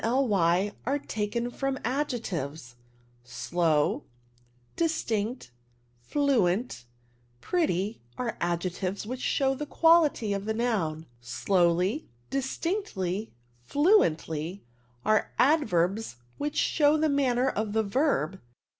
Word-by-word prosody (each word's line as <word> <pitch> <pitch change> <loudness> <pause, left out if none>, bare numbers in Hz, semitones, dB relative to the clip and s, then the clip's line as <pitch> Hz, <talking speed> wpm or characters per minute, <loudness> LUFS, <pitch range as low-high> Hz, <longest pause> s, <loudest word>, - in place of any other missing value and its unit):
ly 205 -6 +2
are 275 +4 0
taken 235 -1 -3
from 270 +1 -2
adjectives: 180 - -3 0.5
slow, 150 +5 0 0.7
distinct, 235 - -1 0.5
fluent, 210 - 0 0.5
pretty^ 215 - 0 0.2
are 240 -2 -2
adjectives 180 +3 -2
which 255 +3 -5
show 270 -1 +1
the 270 - -5
quality 320 -12 +4
of 200 0 -3
the 220 0 -1
noun: 185 -10 -1 0.2
slow^, 175 - +1 0.3
distinct/^, 265 - -2 0.4
fluent^, 175 - +2 0.4
are 215 0 +2
adverbs 220 - +2 0.2
which 290 +1 -2
show 300 0 +3
the 315 +1 +2
manner 265 -3 +2
of 215 -2 -2
the 220 0 +2
verb. 200 - 0
220 Hz, 95 wpm, -28 LUFS, 175-275 Hz, 0.7 s, quality